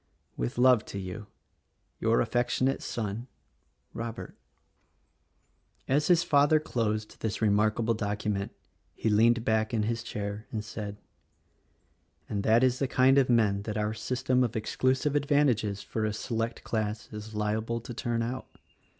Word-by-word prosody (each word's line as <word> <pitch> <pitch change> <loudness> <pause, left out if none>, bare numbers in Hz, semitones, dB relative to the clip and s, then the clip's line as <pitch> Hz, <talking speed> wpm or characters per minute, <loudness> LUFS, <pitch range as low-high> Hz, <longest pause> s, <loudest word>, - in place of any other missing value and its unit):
"With - - -3
love 125 -3 +5
to - - -7
you, 100 +2 -6 0.7
your 115 +1 +3
affectionate 125 +3 0
son, 115 +2 -4 0.7
Robert." 115 0 -6 1.5
As 145 +3 +2
his 170 -2 +5
father 145 -1 +4
closed 110 -7 -2
this 110 -1 -2
remarkable 110 +2 +2
document 105 -2 -2 0.4
he 110 - 0
leaned 115 +2 +4
back 110 +1 +1
in 110 - +1
his 115 +1 -1
chair 105 -1 -5
and 110 -2 -3
said, 105 -2 -6 1.3
"And 100 - -2
that 115 +4 +4
is 130 0 +2
the 135 - +1
kind 130 +2 +5
of 130 - +2
men 105 -4 +3
that 105 +1 -4
our 105 0 0
system 125 +3 0
of 120 -3 -2
exclusive 130 +6 0
advantages 135 -8 +2
for 110 - -3
a 110 -1 0
select 115 +1 -3
class 110 -1 -2
is 105 +1 -7
liable 110 +2 -1
to 120 +2 -8
turn 115 0 -1
out. 125 +3 -4
115 Hz, 140 wpm, -29 LUFS, 105-125 Hz, 1.5 s, love